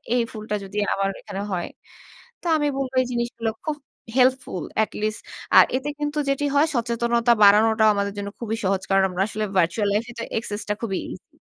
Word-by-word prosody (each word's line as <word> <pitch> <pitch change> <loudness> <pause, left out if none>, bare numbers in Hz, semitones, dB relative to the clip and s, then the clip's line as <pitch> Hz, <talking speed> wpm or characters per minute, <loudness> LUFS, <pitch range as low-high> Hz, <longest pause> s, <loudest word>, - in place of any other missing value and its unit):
এই 245 - +3
ফুলটা 215 -1 -4
যদি 200 +2 -8 0.2
আমার 195 0 0
এখানে 195 - -6
হয়। 175 -2 -2 0.7
তো - - -20
আমি 295 -1 +1
বলবো 265 -1 -3
এই - - -1
জিনিসগুলো 235 -1 -2 0.2
খুব 310 - -1 0.4
হেল্পফুল, 255 - +2 0.2
এটলিস্ট। 215 0 -3 0.4
আর - - +10
এতে 265 +3 -2
কিন্তু 295 0 -2
যেটি 275 +1 0
হয়, 300 +3 +5
সচেতনতা 235 0 +1
বাড়ানোটাও 220 +2 +6
আমাদের 200 0 -1
জন্য 200 0 -4
খুবই 225 -2 -2
সহজ। 190 0 +1
কারণ 195 0 +4
আমরা 180 +1 0
আসলে 215 0 -3
virtual 180 +5 +1
life 220 +3 0
এ - - -12
এটা 230 - -5
access 210 -2 -3
টা - - +2
খুবই 195 -4 -1
ইজি। - - -12
220 Hz, 190 wpm, -23 LUFS, 200-245 Hz, 0.7 s, আর